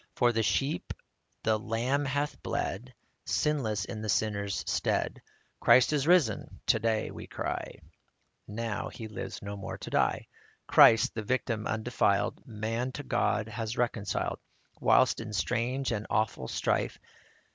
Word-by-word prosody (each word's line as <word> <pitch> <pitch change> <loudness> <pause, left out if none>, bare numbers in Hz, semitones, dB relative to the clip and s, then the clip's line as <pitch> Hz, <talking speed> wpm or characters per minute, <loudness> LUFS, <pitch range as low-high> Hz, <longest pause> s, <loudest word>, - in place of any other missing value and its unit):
For 120 -1 +4
the 115 - +1
sheep 135 +7 0 0.5
the 110 -1 +2
Lamb 125 +6 0
hath 145 +2 -2
bled, 115 +5 -3 0.3
Sinless 115 -10 0
in 110 - -6
the 110 - -4
sinner's 100 +1 0
stead - - 0 0.2
\ - - -41
"Christ 130 +4 +6
is 145 -1 +1
risen," 165 - +2
to 110 - +3
day 110 -1 0
we - - -9
cry; - - -4 0.7
Now 110 0 -3
he 110 - -8
lives 105 -1 -6
no 100 0 -5
more 100 - -6
to - - -8
die. - - +1 0.4
Christ, 115 -2 +6
the 110 - -3
Victim 115 -1 -1
undefiled, 110 0 +1
Man 115 +3 -2
to 145 - -6
God 110 -4 0
hath 110 +1 -4
reconciled, 115 -4 -1 0.4
Whilst - - +4
in 110 -1 -7
strange 120 +7 0
and 110 -2 -3
awful 110 -12 0
strife. - - 0
115 Hz, 145 wpm, -30 LUFS, 105-125 Hz, 0.7 s, Christ